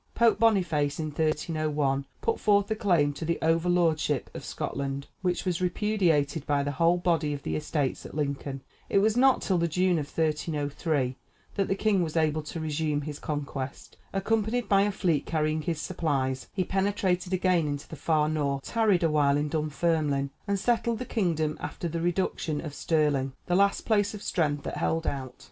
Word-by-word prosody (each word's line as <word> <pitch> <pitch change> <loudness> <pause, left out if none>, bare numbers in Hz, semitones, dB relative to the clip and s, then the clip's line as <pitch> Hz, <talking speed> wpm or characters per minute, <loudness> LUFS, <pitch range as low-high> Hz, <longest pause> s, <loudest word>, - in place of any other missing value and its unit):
Pope 230 -1 +4
Boniface, 175 -10 +2
in 155 -1 -2
1301, 150 -3 0
put 455 - 0
forth 205 0 +3
a - - +2
claim 175 -9 +2
to 140 - -7
the 165 +1 0
over 165 +2 +2
lordship 160 -5 +1
of - - -7
Scotland, 140 0 -4 0.2
which 180 0 -1
was 180 -1 -1
repudiated 175 -6 +1
by 145 -1 +2
the 145 - -1
whole 165 +4 +3
body 165 -4 +1
of 140 - -6
the - - -2
estates 150 -3 -1
at - - -10
Lincoln. 140 -2 -3 0.3
It - - +2
was 215 +2 +3
not 260 +1 +4
till 185 -3 +1
the 170 - +2
June 180 +1 +2
of 145 - -4
1303 150 -3 -1 0.4
that 195 - 0
the 195 - +1
king 200 -2 +2
was 165 -1 -2
able 155 -1 +2
to 160 +2 -6
resume 155 -1 -1
his 145 0 -6
conquest. 140 -3 -5 0.2
Accompanied 220 +4 0
by 195 -1 +4
a 205 +1 +2
fleet 175 -7 0
carrying 155 -1 0
his 165 -1 -2
supplies, 140 -7 -1
he 190 - 0
penetrated 190 -1 0
again 185 -3 +2
into 145 -1 -4
the - - -8
far 150 +1 +1
North, 140 -3 -1
tarried 215 -6 +2
a 165 - +3
while 145 -2 +3
in 150 +1 -1
Dunfermline, 150 -2 0 0.2
and 200 0 +1
settled 235 +1 +1
the 250 - -5
kingdom 160 -10 0
after 175 - -4
the 165 0 -3
reduction 170 -3 -1
of 155 -3 -6
Stirling, 145 -4 +1
the 175 - -1
last 200 +2 +3
place 205 -2 +2
of 205 - -9
strength 145 -4 0
that - - -4
held 165 0 0
out. 130 -3 -3
160 Hz, 185 wpm, -28 LUFS, 145-185 Hz, 0.4 s, Pope